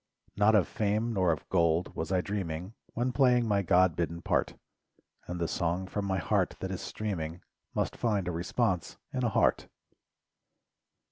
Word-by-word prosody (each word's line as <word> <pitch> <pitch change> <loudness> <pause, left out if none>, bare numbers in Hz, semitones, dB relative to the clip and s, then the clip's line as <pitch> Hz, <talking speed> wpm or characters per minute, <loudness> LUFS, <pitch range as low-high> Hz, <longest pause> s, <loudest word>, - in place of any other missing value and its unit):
Not 105 +2 +4
of 100 -5 +4
fame 110 +2 0
nor 95 -4 +3
of 80 - -3
gold 85 -1 +2
was 80 +3 -3
I. 90 -1 +3
dreaming 90 -1 -4 0.2
When 120 +2 0
playing 125 -3 +4
my 100 -2 +2
God 90 -1 +4
bidden 85 0 -2
part, - - 0 0.7
And 90 0 -4
the 85 - 0
song 85 +2 -1
from 100 +2 -3
my 95 -1 0
heart 85 - +1
that - - -4
is - - -4
streaming 90 -6 -4 0.3
Must - - 0
find 105 -6 0
a - - 0
response 90 +2 -1 0.2
in 130 - -1
a 120 - +3
heart. - - +2
95 Hz, 165 wpm, -30 LUFS, 85-110 Hz, 0.7 s, Not